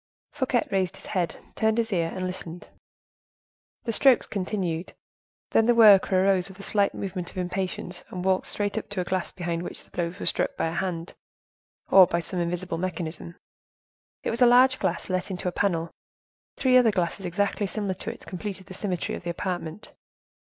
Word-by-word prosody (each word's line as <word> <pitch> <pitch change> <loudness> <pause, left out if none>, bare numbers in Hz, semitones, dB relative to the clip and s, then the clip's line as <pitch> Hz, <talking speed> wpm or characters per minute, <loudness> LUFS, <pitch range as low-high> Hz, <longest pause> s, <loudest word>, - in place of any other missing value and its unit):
Fouquet 260 -4 0
raised 190 -2 0
his - - -13
head, 180 -5 -1 0.2
turned 220 0 +1
his 230 -2 0
ear, 165 -2 0
and 185 0 -2
listened. 180 -2 -7 1.1
The 230 - -1
strokes 255 +2 +5
continued. 185 -4 -3 0.6
Then 225 - +4
the 240 - +5
worker 200 -4 +7
arose 190 -1 +2
with 190 - -13
a - - -8
slight 200 -1 +1
movement 185 -3 -4
of - - -13
impatience 180 0 -3
and 180 0 -5
walked 190 -1 +2
straight 205 +1 -1
up - - -12
to 205 -2 -2
a - - -1
glass 185 0 -2
behind 170 -2 -3
which 175 - -6
the - - -24
blows 175 0 -3
were - - -4
struck - - +1
by 165 - 0
a - - -5
hand, 175 -2 -3 0.8
or 190 -2 +9
by 170 - 0
some 180 +2 -4
invisible 175 0 -2
mechanism. 170 -1 -4 0.9
It - - -1
was 235 +2 -4
a 245 - +8
large 255 +2 +6
glass - - -1
let 185 0 -2
into 185 -1 -4
a - - +1
panel. 170 -3 0 0.7
Three 255 -1 +5
other 245 -3 +6
glasses, 185 -1 -1
exactly 200 +3 0
similar 200 -1 -2
to 185 - -5
it, - - -13
completed 190 +1 -6
the - - -10
symmetry 185 -3 -2
of - - -5
the 175 - -5
apartment. 175 +1 -4
185 Hz, 190 wpm, -26 LUFS, 175-205 Hz, 1.1 s, or